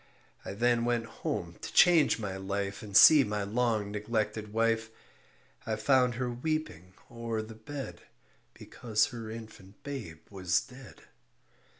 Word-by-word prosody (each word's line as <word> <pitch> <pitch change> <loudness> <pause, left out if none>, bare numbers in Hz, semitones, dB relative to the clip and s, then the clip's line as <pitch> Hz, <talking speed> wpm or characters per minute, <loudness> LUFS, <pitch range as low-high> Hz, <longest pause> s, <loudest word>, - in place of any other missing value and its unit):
I - - -6
then 120 +2 +2
went 120 -1 0
home - - -5
to - - -6
change 170 -4 +5
my 100 -4 -4
life 100 +1 -4
And 100 -2 +1
see 150 -3 +9
my 105 -1 -2
long 110 -1 0
neglected 105 0 -3
wife. 115 0 +1 0.7
I 110 - -2
found 125 +2 +2
her 125 0 -2
weeping 120 - -4 0.2
o'er 115 -2 -3
the 110 +1 -10
bed 135 +5 -8 0.5
Because 110 -2 -1
her 115 -2 -7
infant 110 -3 -11
babe 115 - -7
was 95 -2 +1
dead. 130 -1 -14
110 Hz, 135 wpm, -30 LUFS, 105-120 Hz, 0.7 s, see